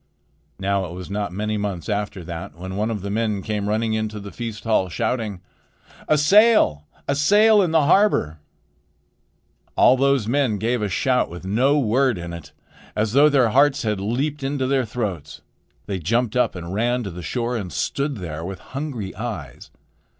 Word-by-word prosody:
Now 100 0 0
it 85 - -8
was 90 +2 -8
not 100 -2 -2
many 105 +3 -2
months 100 -4 -4
after 105 -3 -3
that 80 -3 -7
when 95 +2 -7
one 105 +3 -1
of 105 -4 -4
the 100 - -4
men 105 -2 -1
came 105 -1 -2
running 110 +1 0
into 110 -1 -2
the 100 0 -9
feast 115 -3 -6
hall, 110 -5 +1
shouting: 110 -2 -2 0.7
"A 155 - +4
sail! 175 - +4 0.2
a 140 - +2
sail 205 +9 +5
in 180 - +1
the 160 -1 +3
harbor!" 160 - +3 1.4
All 130 - +6
those 135 -3 +2
men 125 -4 +1
gave 115 +3 -1
a 105 - -1
shout 125 +7 +1
with 90 +2 -9
no 125 +9 +2
word 130 -2 +2
in 85 0 -6
it, 85 - -9 0.4
as 105 0 0
though 145 +3 +6
their 130 -5 +3
hearts 140 +4 +3
had 105 -3 -1
leaped 135 +9 -2
into 135 0 -1
their 130 -1 +1
throats. 100 - -5 0.4
They 95 -2 -3
jumped 115 +7 0
up 125 - +2
and 85 0 -6
ran 120 +4 0
to 100 - -5
the 90 +1 -8
shore 120 +7 -2
and 100 -6 -4
stood 140 - -2
there 80 -4 -6
with 95 +2 -5
hungry 130 - -6
eyes. 95 - -7
110 Hz, 180 wpm, -22 LUFS, 95-130 Hz, 1.4 s, All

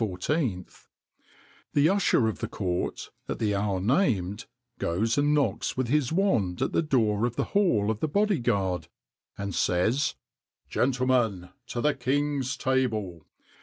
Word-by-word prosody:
[XXIX 90 -5 -3
95] 105 - -4 0.8
The 145 +2 +4
usher 190 - +3
of 110 - -3
the - - -3
court, 90 -3 -3 0.2
at - - -2
the 105 -2 0
hour 100 -1 0
named, 105 - 0 0.3
goes 105 +7 0
and 145 +1 +2
knocks 145 -3 0
with 130 -2 -1
his 145 -1 +1
wand 115 - +1
at - - -1
the - - +2
door 115 -7 +1
of 120 - -6
the - - 0
hall 115 - +3
of 110 - -4
the 155 - 0
body 205 +4 +1
guard, 100 -7 0 0.5
and 100 -1 -4
says: 110 +14 +1 0.5
"Gentlemen, 125 -8 +1 0.2
to 120 - -3
the 150 +2 +2
king's 140 +1 -1
table!" 110 - -1
120 Hz, 150 wpm, -27 LUFS, 100-145 Hz, 0.8 s, The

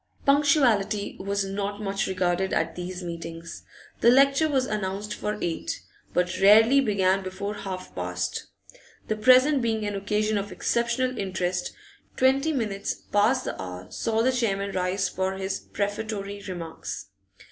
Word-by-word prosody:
Punctuality 275 -8 +3
was 200 +1 -1
not 200 +1 -3
much 200 -1 -1
regarded 185 0 0
at - - 0
these 180 +1 -5
meetings; 165 -1 -7 0.4
the 235 - +6
lecture 275 +4 +5
was 265 -3 +2
announced 210 -1 -3
for 210 0 -3
eight, 165 -1 -2 0.3
but 180 0 0
rarely 225 +7 +7
began 195 -5 +2
before 190 +2 -4
half 190 -3 -6
past 90 0 -3 0.6
The 215 - +1
present 255 +6 +5
being 220 -2 0
an 205 - -2
occasion 210 +1 0
of 200 +1 -5
exceptional 240 +2 0
interest, 185 -2 -2 0.4
twenty 270 +4 +3
minutes 210 -7 -2
past 225 +6 +1
the - - -4
hour 90 0 -8
saw 225 0 0
the 260 - +3
chairman 200 -5 0
rise 185 +1 0
for 190 +1 -2
his 190 0 -3
prefatory 205 0 -4
remarks. 165 - -6
200 Hz, 140 wpm, -26 LUFS, 185-230 Hz, 0.6 s, rarely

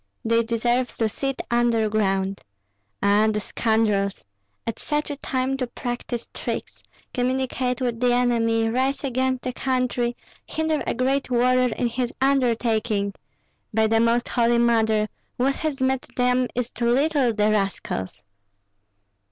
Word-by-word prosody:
They 230 +1 +3
deserve 240 +2 +1
to 225 - +2
sit 270 +5 -3
under 235 -2 +3
ground. 195 -2 0 0.6
Ah, 205 +2 +4
the 210 - -1
scoundrels! 210 -2 0 0.4
at 230 -1 -4
such 295 0 -2
a - - -3
time 265 -1 -1
to 255 -2 -2
practise 240 0 -5
tricks, - - -5 0.3
communicate 255 0 -1
with 240 -2 -1
the 250 0 +3
enemy, 230 -2 +2
rise 260 +5 0
against 260 -1 0
the 255 - -3
country, 250 -2 -1 0.3
hinder 315 -1 -1
a - - 0
great 265 +2 0
warrior 250 0 +3
in - - -1
his 240 +1 -1
undertaking! 230 -6 +1 0.6
By 220 0 +4
the 225 +1 +3
Most 235 +1 +2
Holy 235 -1 +2
Mother, 220 -2 +3 0.3
what 270 +2 +1
has 305 -3 -2
met 260 0 0
them 250 0 +2
is 245 0 -2
too 235 -1 -1
little, 275 0 +3
the 215 -1 +2
rascals!" 105 - -2
240 Hz, 140 wpm, -24 LUFS, 225-255 Hz, 0.6 s, Ah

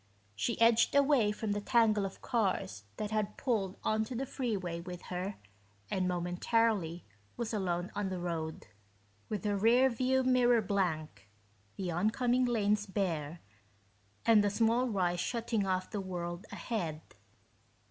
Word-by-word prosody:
She 235 - -1
edged 230 +3 +4
away 275 -7 +4
from 210 0 -3
the 205 0 -1
tangle 215 -4 +3
of 190 - -13
cars 190 - -1
that 210 0 -3
had 210 -1 -1
pulled 210 -7 -1
onto 220 +3 0
the 265 +3 -2
freeway 200 -11 -3
with 180 0 -8
her 185 +3 -3 0.6
and 185 -1 +1
momentarily 180 0 0 0.3
was 235 -2 -3
alone 180 -3 -1
on 205 -2 -2
the 185 - -3
road, 165 -3 -4 0.6
with 210 0 -3
her 205 -1 +1
rear 240 +6 +4
view 260 +2 +1
mirror 245 -3 +4
blank, 170 - -2 0.5
the 185 -2 -3
oncoming 240 +8 +2
lanes 210 -3 +1
bare, 170 -5 -2 0.8
and 220 -3 +6
a 205 - +2
small 230 +4 +2
rise 180 -5 0
shutting 225 -1 -1
off 185 0 -1
the 205 -3 -2
world 175 -1 -5
ahead. 170 -10 -3
205 Hz, 140 wpm, -32 LUFS, 180-230 Hz, 0.8 s, and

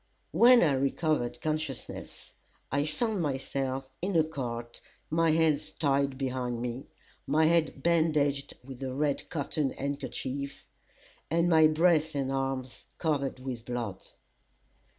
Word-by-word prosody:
When 245 -1 +7
I 155 - +4
recovered 140 -1 0
consciousness, 155 -4 -4 0.4
I 145 +3 +1
found 210 +5 -1
myself 135 -2 -2
in 190 +1 -1
a 160 - +6
cart, 120 -6 -5 0.3
my 165 +1 +3
hands 155 -1 +2
tied 140 -2 +1
behind 125 -3 -2
me, 125 +2 -4 0.4
my 155 +3 +3
head 160 -4 +2
bandaged 155 -4 +2
with 130 0 -10
a 130 -1 -3
red 145 0 -1
cotton 145 -2 -1
handkerchief, 140 0 -4 0.6
and 170 +2 +2
my 160 -2 +6
breast 160 -1 +3
and 135 -1 -1
arms 135 -2 -3
covered 140 -5 -1
with 125 -3 -5
blood. 115 -6 -4
140 Hz, 125 wpm, -29 LUFS, 130-160 Hz, 0.6 s, When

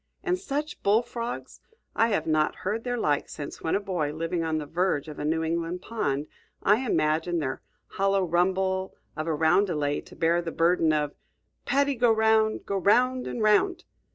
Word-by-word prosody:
And 365 -1 0
such 300 -4 -4
bullfrogs! 235 +3 -1 0.3
I 225 - +4
have 215 - 0
not 155 -1 +1
heard 215 +4 -1
their 245 -1 -2
like 145 -10 0
since, 145 -1 -7
when 160 - 0
a - - +2
boy, 180 -7 -2
living 165 +2 -2
on 160 -1 -1
the 155 - -3
verge 165 -2 0
of 150 - -8
a - - -3
New 160 +1 0
England 170 +2 -2
pond, 145 -11 -2 0.4
I 205 +2 +5
imagined 165 -5 +1
their 135 -3 -3 0.2
hollow 195 0 +1
rumble 190 +2 0 0.2
of 155 0 -4
a 160 - 0
roundelay 160 -2 +2
to - - -14
bear 170 +1 +2
the 170 -1 -5
burden 165 -1 +3
of 150 -1 0 0.5
"Paddy, 280 0 +2
go 240 -2 +3
'round! 220 0 +2
Go 200 - -1
'round 250 +7 +2
and 230 - -3
'round!" 345 - +3
180 Hz, 180 wpm, -27 LUFS, 160-220 Hz, 0.5 s, I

